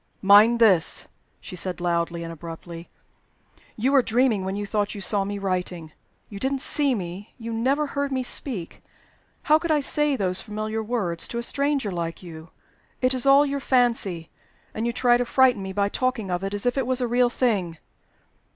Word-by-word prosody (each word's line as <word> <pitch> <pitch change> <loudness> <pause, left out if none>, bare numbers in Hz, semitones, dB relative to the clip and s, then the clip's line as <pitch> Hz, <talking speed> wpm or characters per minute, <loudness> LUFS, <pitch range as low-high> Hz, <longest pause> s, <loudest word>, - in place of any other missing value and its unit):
"Mind 210 +4 +7
this!" 190 -8 +3 0.3
she 185 - -9
said, 180 +1 -4
loudly 170 -1 -1
and 165 0 -6
abruptly, 165 +1 -9 0.9
"you 250 +5 0
were 275 -2 +5
dreaming 235 -4 +1
when 190 +1 -3
you 205 0 -3
thought 205 0 -2
you - - -6
saw 200 0 0
me 200 +1 -4
writing. 180 -4 -3 0.4
You 200 - -9
didn't 265 +3 -1
see 280 -3 +2
me; 185 +1 -7
you 230 -1 -6
never 270 +6 +1
heard 280 -1 -3
me 260 -1 -1
speak. 235 - -3 0.6
How 310 0 +4
could 335 - -4
I 310 -1 +3
say 295 +1 +1
those 185 -5 +1
familiar 215 +1 -4
words 210 -7 -3
to 235 - -5
a 235 - -2
stranger 280 -4 0
like 170 0 -4
you? 160 -1 -10 0.5
It's 255 0 +1
all 275 +1 +6
your 280 0 -2
fancy 230 -11 0 0.4
and 225 +2 -2
you - - 0
try 240 0 +3
to 245 - 0
frighten 250 -3 +3
me 190 0 -5
by 200 +1 0
talking 230 -3 -2
of 180 +1 -2
it 195 +1 -3
as 205 - -4
if 245 +2 +1
it 255 - -2
was 255 0 +1
a 250 - 0
real 245 +1 +2
thing!" 200 -10 -1
215 Hz, 190 wpm, -24 LUFS, 185-255 Hz, 0.9 s, Mind